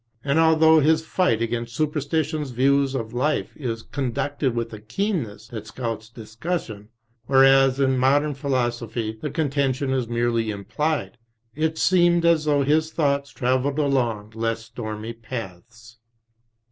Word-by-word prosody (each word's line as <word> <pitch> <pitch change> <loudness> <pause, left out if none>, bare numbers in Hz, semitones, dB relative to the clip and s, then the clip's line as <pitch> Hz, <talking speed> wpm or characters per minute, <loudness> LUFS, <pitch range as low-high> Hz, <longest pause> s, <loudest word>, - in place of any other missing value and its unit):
And 140 +3 +1
although 160 0 +5
his 160 +2 +2
fight 115 -13 +1
against 115 0 -3
Superstition's 150 0 -1
views 135 +2 +2
of 115 -3 -4
life 150 +5 -1
is 115 -6 -4
con 130 -4 -3
ducted 140 -1 -1
with 115 -1 -3
a 110 - -7
keenness 115 - -3
that 110 -2 -7
scouts 115 -1 -5
discussion, 110 - -5 0.4
whereas 135 0 +5
in 130 -1 +2
modem 145 +3 +3
Philosophy 120 -5 -2
the 150 - -3
contention 140 -2 0
is 130 -3 -1
merely 120 -1 0
Implied, 120 +7 -2 0.3
it 160 +3 -1
seemed 175 -1 +3
as 165 -2 +3
though 145 -2 +2
his 155 +3 +1
thoughts 140 -3 0
travelled 130 +3 0
along 120 -8 0
less 115 0 -2
stormy 110 -1 -6
paths. 115 0 -9
130 Hz, 135 wpm, -23 LUFS, 115-150 Hz, 0.4 s, although